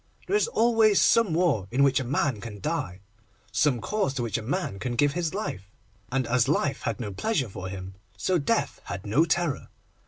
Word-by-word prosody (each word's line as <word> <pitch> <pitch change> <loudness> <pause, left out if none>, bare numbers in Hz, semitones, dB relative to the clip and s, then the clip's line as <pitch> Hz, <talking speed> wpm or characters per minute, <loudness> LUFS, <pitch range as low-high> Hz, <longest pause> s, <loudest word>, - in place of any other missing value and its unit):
There 405 - 0
is 420 - +3
always 225 - +4
some 230 -6 +4
war 155 - +2
in 130 +4 +2
which 135 -1 +4
a - - -2
man 130 -3 0
can 105 -3 -8
die, 100 - -3 0.5
some 120 +5 +2
cause 200 - -1
to 125 - -1
which 115 - -3
a - - -6
man 120 - -3
can 125 +1 -3
give 145 +3 +3
his 175 0 -2
life, 100 - -4 0.4
and 130 0 0
as 120 0 +2
life 145 -1 0
had 115 - -2
no 105 -5 -4
pleasure 145 - -1
for 95 -1 -6
him, 95 0 -7 0.2
so 180 - +1
death 140 - 0
had 95 +4 -6
no 125 +11 +3
terror. 170 -2 0
135 Hz, 205 wpm, -26 LUFS, 105-175 Hz, 0.5 s, always